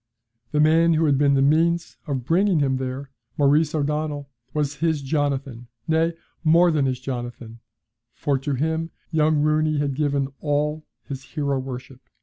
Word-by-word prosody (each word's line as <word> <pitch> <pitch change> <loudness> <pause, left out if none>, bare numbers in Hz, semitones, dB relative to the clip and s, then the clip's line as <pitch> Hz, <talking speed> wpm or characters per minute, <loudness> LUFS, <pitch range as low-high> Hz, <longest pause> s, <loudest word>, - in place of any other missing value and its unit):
The 150 - +1
man 165 +2 +5
who 160 +1 +2
had 140 -3 +3
been 140 -1 +4
the 135 - +3
means 165 +4 +2
of 135 -4 -3
bringing 185 +4 +3
him 135 -2 +1
there, 130 +1 -5 0.3
Maurice 150 +2 +3
O'Donnell, 150 -1 -2 0.2
was 150 -1 -2
his 160 -1 0
Jonathan, 135 -4 -2 0.2
nay 160 +1 +2 0.3
more 170 +2 +5
than 145 -4 +1
his 130 -1 -2
Jonathan, 120 -3 -6 0.5
for 140 +1 -1
to 140 +1 -2
him 160 +4 -1 0.2
young 155 -2 +2
Rooney 155 0 +2
had 145 -1 0
given 140 -1 0
all 150 +1 -1 0.2
his 135 -1 -6
hero 140 -2 -2
worship. 130 0 -8
145 Hz, 155 wpm, -23 LUFS, 135-155 Hz, 0.5 s, man